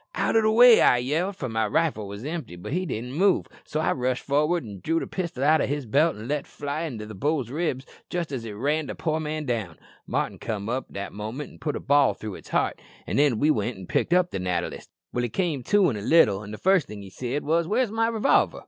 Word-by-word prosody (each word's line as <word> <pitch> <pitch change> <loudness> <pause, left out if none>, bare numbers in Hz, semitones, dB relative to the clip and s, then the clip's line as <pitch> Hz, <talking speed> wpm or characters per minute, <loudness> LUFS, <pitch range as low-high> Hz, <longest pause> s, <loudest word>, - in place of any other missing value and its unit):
"'Out - - 0
o' 225 - +6
the 215 - +3
way,' 235 +1 +8
I 125 - +6
yelled, 160 +11 -1
for 135 - -4
my 110 -2 0
rifle 125 -5 0
was 100 +5 -8
empty; 155 - -5
but 90 +10 -7
he 185 +1 -1
didn't 125 -2 -4
move, 190 +5 +3 0.2
so 155 - -3
I 160 - +1
rushed 130 0 -1
for'ard 150 +4 +1
an' 100 -3 -8
drew 165 +1 +1
the - - -4
pistol 170 -8 -4
out 155 +1 +4
o' - - +1
his 145 -1 -2
belt 150 +9 +2
and 110 +2 -8
let 145 +1 -2
fly 145 +3 -4
in 135 -8 -5
the 105 0 -7
bull's 135 +2 -1
ribs 140 -4 -2 0.2
jist 175 -4 -3
as 130 -4 -4
it 110 -2 -6
ran 145 +7 -1
the - - -5
poor 160 -1 -1
man 155 0 -3
down. 110 - -3 0.3
Martin - - -2
came 105 -1 -4
up 130 +2 -2
that 100 0 -6
moment 110 +8 -6
an' - - -16
put 150 - -2
a - - -3
ball 140 -1 +3
through 110 -2 -6
its - - -11
heart, - - 0 0.2
an' - - -2
then 140 -5 +4
we 150 +6 +3
went 110 -2 -1
to 95 - -9
pick - - 0
up 180 0 +3
the - - -3
natter 90 -1 -1
list. - - -10 0.3
He 120 0 0
came 165 - -1
to 200 -6 +4
in - - -4
a 105 - -5
little, 105 -6 +4
an' 105 - -9
the 105 - -6
first 190 - +3
thing 105 -1 -8
he 95 - -11
said 130 +7 -3
was, 165 +2 +1
'Where's 225 +3 +1
my 225 +1 +1
revolver?' 230 +3 +2
145 Hz, 255 wpm, -25 LUFS, 110-165 Hz, 0.3 s, way